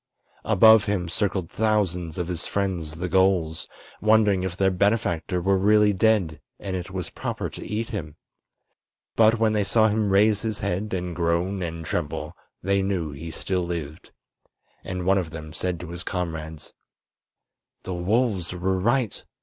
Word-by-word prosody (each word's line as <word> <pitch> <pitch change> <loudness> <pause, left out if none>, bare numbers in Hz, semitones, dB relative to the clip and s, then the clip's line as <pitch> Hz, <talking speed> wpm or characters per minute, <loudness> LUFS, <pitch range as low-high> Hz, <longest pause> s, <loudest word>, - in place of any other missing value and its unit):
Above 110 0 +6
him 100 -4 -1
circled 95 0 -1
thousands 95 -7 0
of 90 -2 -2
his 85 -2 -4
friends 90 -6 -2
the 90 +3 -3
gulls, 90 -3 +1 0.3
wondering 110 -3 +4
if 95 -1 -4
their 95 -1 +3
benefactor 95 -2 0
were 95 +2 +2
really 105 +1 +4
dead 95 -7 +1 0.2
and 95 -2 -4
it 90 0 -5
was 90 -2 -5
proper - - -4
to - - -8
eat 110 +2 -3
him. 80 -10 -5 1.0
But 110 +1 +5
when 110 -1 +2
they 105 -1 +2
saw 110 +2 +3
him 105 -1 0
raise 105 +2 +4
his 110 -2 -3
head 100 +1 -2
and 90 -1 -4
groan 85 +3 0
and 85 -1 -4
tremble 75 -1 -3 0.3
they 100 +1 +2
knew 95 -5 -1
he 80 +4 -7
still 90 +3 -2
lived, 85 -3 -5 0.7
and 90 -1 -4
one 95 +1 +4
of 85 -4 -4
them 80 -1 -8
said 90 -2 -2
to 90 - -8
his 85 0 -6
comrades: 80 -4 -5 1.1
"The 95 - -4
wolves 95 0 0
were 95 +1 -1
right. 120 +2 0
95 Hz, 160 wpm, -25 LUFS, 85-105 Hz, 1.1 s, Above